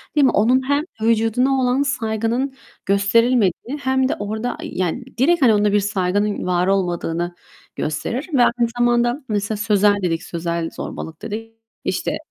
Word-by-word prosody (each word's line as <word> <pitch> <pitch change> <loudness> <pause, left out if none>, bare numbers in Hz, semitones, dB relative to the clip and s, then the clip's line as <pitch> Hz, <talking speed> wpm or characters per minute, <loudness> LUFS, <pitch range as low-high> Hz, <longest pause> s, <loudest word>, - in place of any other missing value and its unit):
değil 290 - +5
mi, - - +4
onun 255 +5 +2
hem 285 +1 +2 0.2
vücuduna 230 +4 +2
olan 255 +2 +2
saygının 240 0 -1 0.3
gösterilmediği 225 - +2
hem 265 0 +1
de - - 0
orada, 220 +4 -3
eee, - - -6
yani 185 +8 -2
direkt, 330 +6 +3
hani, 235 -5 +6
onda 205 0 +2
bir 205 - +5
saygının 205 0 0
var 180 0 +1
olmadığını 175 -2 -1 0.4
gösterir. 235 - -3
Ve 260 - +4
aynı 235 -1 +2
zamanda 240 +3 +2
mesela 205 0 -1
sözel 210 -1 +3
dedik, 165 -2 -1
sözel 170 -1 -3
zorbalık 160 - -7
dedik. 225 +1 -6 0.3
İşte, - - -1
220 Hz, 150 wpm, -20 LUFS, 195-250 Hz, 0.4 s, hani